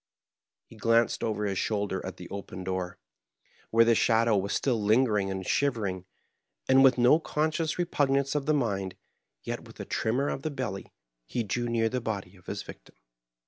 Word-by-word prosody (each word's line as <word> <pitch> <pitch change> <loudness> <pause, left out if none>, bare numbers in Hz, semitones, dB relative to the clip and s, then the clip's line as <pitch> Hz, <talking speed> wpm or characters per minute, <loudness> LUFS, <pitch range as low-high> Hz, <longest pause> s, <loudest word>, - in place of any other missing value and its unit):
He - - -16
glanced 115 +1 +2
over 105 -2 -1
his 100 -3 -1
shoulder 100 -3 -1
at - - -6
the - - -9
open 95 -1 -6
door, 95 0 -3 0.7
where 115 +1 +5
the 115 - +5
shadow 115 0 +3
was 100 0 0
still 120 -5 +1
lingering 105 -2 +3
and 95 0 -3
shiyering; 105 -10 0 0.6
and 130 0 +6
with 130 -2 +6
no 125 +6 +5
conscious 155 +1 -1
repugnance 140 -6 +1
of 145 -1 -2
the 155 - +3
mind, 100 -8 -1 0.5
yet - - -4
with - - -15
a - - -5
tremor 125 +6 0
of - - -3
the 155 - -2
belly, 125 -9 -5 0.4
he 120 - -2
drew 120 +3 -2
near 115 -1 +2
the 125 +2 -2
body 100 -4 -4
of 90 - -21
his - - -4
victim. - - -13
115 Hz, 180 wpm, -28 LUFS, 100-135 Hz, 0.7 s, and